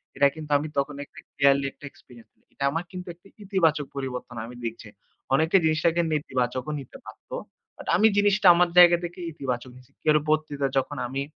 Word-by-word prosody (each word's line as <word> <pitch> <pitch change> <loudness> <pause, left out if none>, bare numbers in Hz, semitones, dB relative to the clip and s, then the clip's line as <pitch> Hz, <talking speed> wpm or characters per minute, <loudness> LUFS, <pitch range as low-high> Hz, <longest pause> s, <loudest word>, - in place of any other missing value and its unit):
এটা 140 +1 +5
কিন্তু 155 -2 -8
আমি 150 +2 -4
তখন 140 +1 -1
একটা - - -15 0.2
clearly 140 0 +3
একটা 145 - -14
experience 120 -2 -18
পেলাম। - - -40
এটা 140 - -6
আমার 165 +3 -2
কিন্তু 180 0 -8
একটি 175 +3 -22 0.2
ইতিবাচক 165 -7 +1
পরিবর্তন 125 -2 -5
আমি 120 +1 -10
দেখছি। 115 -1 -6 0.5
অনেকে 160 +6 +2
জিনিসটাকে 160 +2 +2
নেতিবাচকও 130 -2 -2
নিতে 135 - -11
পারত। - - -14 0.5
But - - -11
আমি 215 +5 +5
জিনিসটা 205 -1 +3
আমার 175 0 +3
জায়গা 175 -1 +8
থেকে 175 +1 -6
ইতিবাচক 130 -4 -4
নিছি। 125 +1 -19 0.2
এর 155 - +6
পরবর্তীতে 150 -2 0
যখন 140 +2 -1
আমি 135 +1 -2
145 Hz, 180 wpm, -25 LUFS, 135-170 Hz, 0.5 s, জায়গা